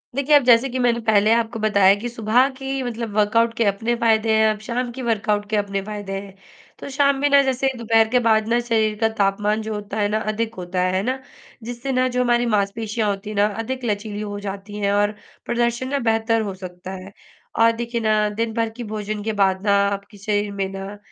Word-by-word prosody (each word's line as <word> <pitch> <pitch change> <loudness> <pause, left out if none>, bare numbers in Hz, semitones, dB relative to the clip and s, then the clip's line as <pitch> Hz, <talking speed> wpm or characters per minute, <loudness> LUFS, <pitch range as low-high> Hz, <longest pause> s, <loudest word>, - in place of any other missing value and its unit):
देखिए, 280 +2 +3
अब 290 - +6
जैसे 245 +2 +5
कि 255 - -3
मैंने 240 -1 +2
पहले 215 0 +4
आपको 230 0 0
बताया 200 -3 +4
कि 240 +3 -4
सुबह 235 +3 +2
की 270 0 -3
मतलब 230 -3 -5
वर्कआउट 230 +2 +3
के 235 - +2
अपने 220 +4 0
फ़ायदे 220 -1 +3
हैं, 220 - +4
अब 210 - -11
शाम 245 +1 -2
की - - -4
वर्कआउट 210 -2 0
के 215 - 0
अपने 200 -1 -1
फ़ायदे 205 -1 -6
हैं। 195 -1 -13 0.4
तो - - -7
शाम 280 -1 +3
में 290 - +2
ना 280 0 +6
जैसे 265 0 0
दोपहर 225 -1 +3
के 250 +1 +3
बाद 220 -1 +3
ना 235 +1 +2
शरीर 220 -2 +1
का 225 -1 +2
तापमान 205 +2 +1
जो 220 0 -4
होता 210 0 -5
है 205 - +2
ना, 215 +1 0
अधिक 220 +1 -3
होता 180 0 -3
है, 185 0 +1
है 190 - +1
ना? 260 +2 -2 0.4
जिससे 245 +3 -5
ना 255 0 +2
जो 250 - +3
हमारी 240 0 +2
मांसपेशियाँ 210 +2 0
होती 200 +1 -4
हैं 215 - -6
ना 205 +1 +4 0.2
अधिक 260 +2 -5
लचीली 210 -1 -3
हो 205 -1 -5
जाती 200 +1 -6
हैं 200 - +2
और 205 +1 +2 0.3
प्रदर्शन 235 +1 0
ना 280 0 0
बेहतर 225 0 +1
हो - - -5
सकता 180 0 -8
है। 195 +2 -12 0.4
और 230 0 +5
देखिए 235 0 -3
ना, 215 -1 +2
दिन 225 +2 -3
भर 230 0 0
की 245 - -5
भोजन 210 0 -4
के 220 +1 -2
बाद 190 -1 +1
ना 200 - +4 0.2
आपके 200 +1 -6
शरीर 205 0 -1
में 195 - 0
ना 195 +1 -7
220 Hz, 225 wpm, -22 LUFS, 205-235 Hz, 0.4 s, अब